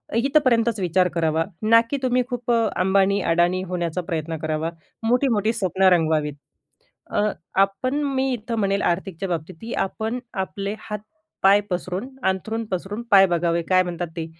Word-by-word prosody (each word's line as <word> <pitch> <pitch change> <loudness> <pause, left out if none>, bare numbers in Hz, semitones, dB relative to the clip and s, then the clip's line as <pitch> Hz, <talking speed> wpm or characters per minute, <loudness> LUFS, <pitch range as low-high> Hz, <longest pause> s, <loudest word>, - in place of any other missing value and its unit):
इथपर्यंतच 235 -4 +2
विचार 180 0 +2
करावा. 160 -1 +1 0.2
ना 230 +1 +6
की 285 - -1
तुम्ही 250 0 +2
खूप 245 -1 -2
अंबानी, 200 -3 +2
अडाणी 175 +2 +2
होण्याचा 175 -1 -2
प्रयत्न 165 -1 -3
करावा, 155 +1 -1 0.3
मोठी-मोठी 230 -2 +2
स्वप्न 190 -3 +1
रंगवावीत. 155 -3 +1 0.8
अ, - - +1 0.4
आपण 195 +7 0 0.2
मी 265 0 +1
इथं 230 0 -4
म्हणेल 200 -1 +1
आर्थिकच्या 190 +1 -6
बाबतीत 170 +1 -4
ही 230 - -5
आपण 220 +5 -4 0.3
आपले 200 +2 -5
हात-पाय 210 -1 0
पसरून, 185 +4 -3 0.2
अंथरून 220 +4 -1
पसरून 195 +4 -3
पाय 195 -1 +8
बघावे, 170 -1 +1
काय 185 -1 +5
म्हणतात 175 -1 -4
ते? 165 - -2
195 Hz, 140 wpm, -23 LUFS, 175-225 Hz, 0.8 s, पाय